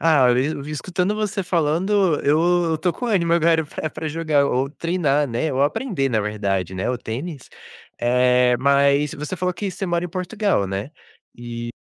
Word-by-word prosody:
Ah, 150 -5 +4
eu 120 - +2 0.2
eu - - -6
vim 150 - -8
escutando 180 +7 -1
você 210 -2 -2
falando, 175 +2 +1
eu 170 +5 +3
eu 160 - 0
tô 175 +1 0
com 245 - -5
ânimo 175 -7 +1
agora 165 -1 +3
pra 155 +1 -5
pra 160 - -5
jogar 150 -3 +1
ou 135 +1 0
treinar 150 -3 0
né, 125 +6 -1
ou 135 +2 +1
aprender 145 - 0
na 110 -3 +1
verdade, 100 -3 -2
né, 95 - -2
o 125 - 0
tênis, 135 +6 -6 0.5
eh, 125 0 +3
mas 140 +1 +3
você 150 +5 -5
falou 180 +1 -1
que 200 +2 -4
você 195 - -5
mora 175 0 0
em - - -4
Portugal, 185 - -1
né? 95 +8 -4 0.4
E 120 0 -6
150 Hz, 190 wpm, -22 LUFS, 125-175 Hz, 0.5 s, Ah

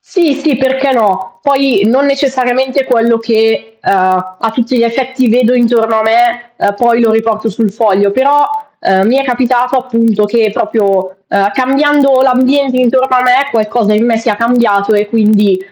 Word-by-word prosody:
Sì, 335 -7 -1
sì, 290 -2 -1
perché 265 +1 0
no. 195 +1 -2
Poi 275 -6 +1
non 265 +5 +1
necessariamente 265 -1 -1
quello 235 -2 +1
che, 225 0 -1
uhm, - - -1 0.5
a 225 - -1
tutti 245 +1 -1
gli 235 - +2
effetti 260 +1 -1
vedo 245 +1 +2
intorno 230 -2 +1
a 220 - 0
me, 240 +2 0
ehm, 200 - -1
poi 235 +2 +1
lo 230 -2 +2
riporto 225 0 -1
sul 215 +1 -2
foglio. 200 -2 +1
Però, 285 +4 +2 0.3
ehm, 190 +1 +1
mi 245 - +2
è 275 - -1
capitato, 250 0 0
appunto, 230 -4 0
che 220 0 0
proprio, 195 -4 -2
ehm, 200 0 0
cambiando 275 0 +1
l'ambiente 260 +1 +1
intorno 255 +1 +1
a 250 - +1
me 255 +3 +2
qualcosa 215 -1 0
in 220 +3 +1
me 230 - +1
sia 220 -2 -2
cambiato 230 -3 +1
e 205 0 0
quindi, 210 -3 +2
235 Hz, 170 wpm, -11 LUFS, 220-260 Hz, 0.5 s, gli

